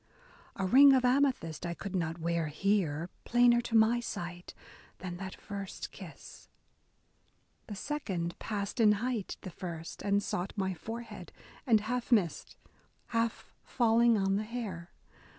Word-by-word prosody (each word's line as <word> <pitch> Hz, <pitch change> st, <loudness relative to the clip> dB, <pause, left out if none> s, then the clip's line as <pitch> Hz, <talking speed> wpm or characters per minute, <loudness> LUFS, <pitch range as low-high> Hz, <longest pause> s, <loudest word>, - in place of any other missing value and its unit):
A 195 Hz, -, -2 dB
ring 275 Hz, +8 st, +8 dB
of 255 Hz, -1 st, +3 dB
amethyst 250 Hz, -, +1 dB
I 170 Hz, -1 st, -3 dB
could 195 Hz, +1 st, -6 dB
not 165 Hz, -2 st, -1 dB
wear 170 Hz, -1 st, -1 dB
here, 170 Hz, -1 st, 0 dB
plainer 240 Hz, 0 st, +4 dB
to 235 Hz, -1 st, +1 dB
my 225 Hz, +2 st, +4 dB
sight. 175 Hz, -6 st, -6 dB, 0.4 s
Than 175 Hz, -1 st, -6 dB
that 190 Hz, 0 st, -6 dB
first 200 Hz, -2 st, -6 dB
kiss. -, -, -12 dB, 1.2 s
The 210 Hz, -, -6 dB
second 190 Hz, -, -3 dB
passed 205 Hz, +2 st, -4 dB
in 215 Hz, -2 st, +6 dB
height 225 Hz, -1 st, -2 dB
The 185 Hz, -, -7 dB
first, 170 Hz, -2 st, -7 dB
and 200 Hz, 0 st, +1 dB
sought 180 Hz, 0 st, -3 dB
my 190 Hz, -2 st, -1 dB
forehead, 225 Hz, +7 st, -8 dB, 0.4 s
and 220 Hz, -3 st, +5 dB
half 245 Hz, +4 st, -3 dB
missed. 195 Hz, -9 st, +1 dB, 0.5 s
Half 230 Hz, -1 st, -1 dB
falling 235 Hz, -1 st, +3 dB
on 195 Hz, 0 st, +1 dB
the 210 Hz, -, -1 dB
hair. 210 Hz, -7 st, -5 dB
200 Hz, 140 wpm, -31 LUFS, 175-235 Hz, 1.2 s, ring